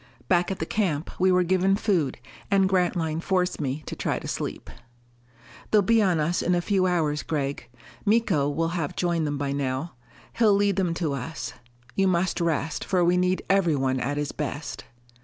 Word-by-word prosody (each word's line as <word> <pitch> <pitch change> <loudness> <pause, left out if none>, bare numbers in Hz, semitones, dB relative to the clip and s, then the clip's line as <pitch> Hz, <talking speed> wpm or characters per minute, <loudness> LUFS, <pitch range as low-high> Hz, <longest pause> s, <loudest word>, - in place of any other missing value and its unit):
Back 175 -1 +2
at 195 - -3
the 160 - -3
camp 170 -6 -1
we 185 +1 +4
were 180 0 +4
given 185 +2 +2
food, 185 - 0 0.3
and 195 -2 +4
Grantline 175 -4 0
forced 180 -2 0
me 140 +2 -3
to - - -5
try - - -1
to - - -7
sleep. - - -4 1.0
"They'll 210 -2 +4
be 225 +3 +4
on 185 -5 +2
us 165 +4 0
in 180 - +2
a - - +2
few 185 +1 +1
hours, 155 -4 +1
Gregg. 140 -5 -3 0.3
Miko 200 -10 +2
wall 165 +3 0
have 165 -4 -3
joined 170 -3 0
them 145 -1 -2
by 140 -1 -2
now. 140 +3 -2 0.5
He'll 215 -4 +5
lead 200 -1 +2
them 180 -3 +1
to 160 -4 -1
us. 140 +3 -5 0.4
You 195 +6 +2
must 180 -1 +1
rest, 160 -1 -1
for 180 -3 +1
we 175 +1 +3
need 180 +1 +1
everyone 145 -9 +2
at 140 +4 -2
his 145 -1 -2
best." 150 0 -5
175 Hz, 185 wpm, -25 LUFS, 150-185 Hz, 1.0 s, He'll